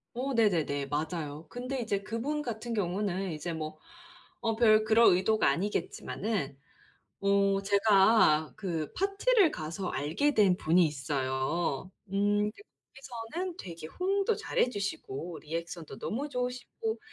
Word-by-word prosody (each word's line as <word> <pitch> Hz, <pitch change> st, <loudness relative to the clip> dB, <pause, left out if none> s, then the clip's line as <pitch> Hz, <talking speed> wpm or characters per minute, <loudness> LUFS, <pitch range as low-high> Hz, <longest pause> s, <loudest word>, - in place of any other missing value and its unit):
어 265 Hz, +3 st, -2 dB
네네네. 165 Hz, -11 st, +2 dB
맞아요. 155 Hz, +1 st, -3 dB
근데 255 Hz, +6 st, -4 dB
이제 200 Hz, -3 st, -1 dB
그분 270 Hz, +9 st, -2 dB
같은 235 Hz, -2 st, -4 dB
경우는 190 Hz, -1 st, -1 dB
이제 160 Hz, +2 st, -4 dB
뭐 155 Hz, -1 st, -5 dB, 0.6 s
어 225 Hz, -2 st, 0 dB
별 215 Hz, -2 st, +5 dB
그럴 225 Hz, +1 st, +6 dB
의도가 215 Hz, +4 st, +2 dB
아니겠지만은 190 Hz, -3 st, -2 dB, 0.6 s
어 200 Hz, 0 st, +3 dB
제가 200 Hz, -6 st, +4 dB
그 165 Hz, -6 st, -3 dB
파티를 395 Hz, 0 st, +3 dB
가서 165 Hz, +4 st, -4 dB
알게 165 Hz, -, 0 dB
된 195 Hz, -4 st, +4 dB
분이 170 Hz, +2 st, +4 dB
있어요. 140 Hz, +2 st, -1 dB, 0.2 s
음 205 Hz, +1 st, +2 dB
거기서는 270 Hz, -, -8 dB
되게 170 Hz, -, -8 dB
호응도 395 Hz, -, 0 dB
잘 -, -, -3 dB
해 -, -, +4 dB
주시고 175 Hz, -, -4 dB
리액션도 165 Hz, +1 st, -6 dB
너무 265 Hz, +7 st, -3 dB
좋으시고 250 Hz, -, -3 dB
200 Hz, 265 characters per minute, -30 LUFS, 165-235 Hz, 0.6 s, 그럴